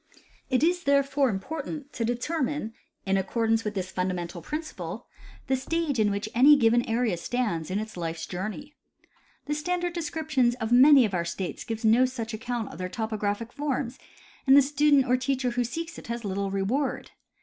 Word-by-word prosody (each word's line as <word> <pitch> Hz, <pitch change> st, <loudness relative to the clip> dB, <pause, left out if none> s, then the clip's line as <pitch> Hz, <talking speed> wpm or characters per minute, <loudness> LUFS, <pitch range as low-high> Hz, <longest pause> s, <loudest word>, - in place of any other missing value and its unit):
It 255 Hz, 0 st, +2 dB
is 350 Hz, +1 st, +1 dB
therefore 280 Hz, -1 st, +3 dB
important 290 Hz, +7 st, -5 dB
to 235 Hz, -, -2 dB
determine 245 Hz, 0 st, -2 dB, 0.3 s
in 195 Hz, 0 st, +2 dB
accordance 225 Hz, +3 st, +1 dB
witli 210 Hz, -1 st, -4 dB
this 185 Hz, -2 st, -3 dB
fundamental 180 Hz, -2 st, -3 dB
principle 310 Hz, -, -6 dB, 0.4 s
the 265 Hz, -, +1 dB
stage 290 Hz, 0 st, -1 dB
in 210 Hz, -1 st, +3 dB
which 200 Hz, +1 st, -2 dB
any 275 Hz, +5 st, +7 dB
given 240 Hz, -1 st, +4 dB
area 225 Hz, -5 st, +1 dB
stands 170 Hz, -4 st, -2 dB
in 190 Hz, -, -1 dB
its 215 Hz, +1 st, -5 dB
life's 165 Hz, -2 st, -4 dB
journey. 215 Hz, +11 st, -6 dB, 0.7 s
The 295 Hz, -, -1 dB
standard 350 Hz, +3 st, -1 dB
descriptions 305 Hz, -7 st, 0 dB
of 220 Hz, -2 st, -4 dB
many 265 Hz, +1 st, +8 dB
of 205 Hz, -, -3 dB
our 175 Hz, -2 st, 0 dB
states 170 Hz, +2 st, -4 dB
gives 225 Hz, 0 st, -4 dB
no 230 Hz, +4 st, +5 dB
such 240 Hz, -3 st, -4 dB
account 230 Hz, 0 st, -4 dB
of -, -, -11 dB
their 185 Hz, 0 st, -3 dB
topographic 220 Hz, +2 st, -3 dB
forms, 275 Hz, -3 st, -3 dB, 0.5 s
and 270 Hz, +1 st, +8 dB
the 285 Hz, -, +8 dB
student 285 Hz, -1 st, +3 dB
or 250 Hz, 0 st, +3 dB
teacher 255 Hz, -1 st, -1 dB
who 245 Hz, +1 st, 0 dB
seeks 330 Hz, +8 st, -5 dB
it -, -, -13 dB
has 235 Hz, -1 st, -4 dB
little 200 Hz, 0 st, -2 dB
reward. 200 Hz, +9 st, -1 dB
240 Hz, 175 wpm, -27 LUFS, 210-280 Hz, 0.7 s, many